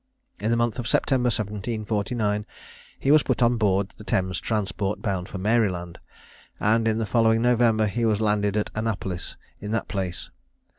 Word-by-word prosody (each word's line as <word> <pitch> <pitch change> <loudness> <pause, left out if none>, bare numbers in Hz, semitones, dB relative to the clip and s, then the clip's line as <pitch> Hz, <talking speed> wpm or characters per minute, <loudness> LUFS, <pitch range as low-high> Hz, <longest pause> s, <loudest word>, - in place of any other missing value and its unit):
In 110 - -1
the 115 - +2
month 120 +1 0
of 120 - -3
September, 125 +1 +2
1749, 105 0 -1 0.5
he 140 - +2
was 155 0 +7
put 125 - 0
on 120 0 +3
board 100 -2 +1
the - - -9
Thames 95 -2 0
transport, 105 -2 -2
bound 95 -3 -2
for - - -6
Maryland, 95 -5 0 0.6
and 115 +2 +2
in 110 -1 +1
the 115 - -1
following 115 +1 +3
November 120 -3 +3
he 115 +3 -1
was 110 -2 +2
landed 105 -1 +1
at 105 - -1
Annapolis, 100 -5 -3 0.2
in 105 - -6
that 115 - -1
place. 95 -4 -4
110 Hz, 165 wpm, -25 LUFS, 100-115 Hz, 0.6 s, was